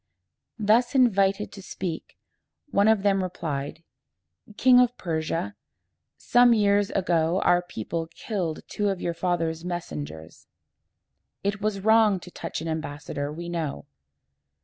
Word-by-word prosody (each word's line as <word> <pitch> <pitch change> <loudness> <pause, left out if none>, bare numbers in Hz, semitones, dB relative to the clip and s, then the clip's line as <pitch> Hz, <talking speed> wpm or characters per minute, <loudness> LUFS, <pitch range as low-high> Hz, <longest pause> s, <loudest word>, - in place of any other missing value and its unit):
Thus 225 +4 +2
invited 200 -5 +3
to 200 - -10
speak, 180 -3 -6 0.5
one 200 +1 +3
of 220 -3 +3
them 195 -1 +3
replied, 160 -4 -4 0.7
"King 250 -1 +6
of 245 -1 +3
Persia, 160 - -2 0.6
some 245 -1 +5
years 205 -1 +3
ago 175 -2 +1
our 175 0 +4
people 165 - -5
killed 170 -2 -4
two 205 -1 -1
of 195 -2 -2
your 170 - -2
father's 165 -2 -1
messengers. 80 - -6 1.0
It 200 0 -1
was 210 -1 -1
wrong 220 -2 +4
to 180 - -11
touch - - -5
an 165 - -5
ambassador, 145 -2 -4
we 170 +3 -7
know. 160 - -4
180 Hz, 125 wpm, -26 LUFS, 160-205 Hz, 1.0 s, King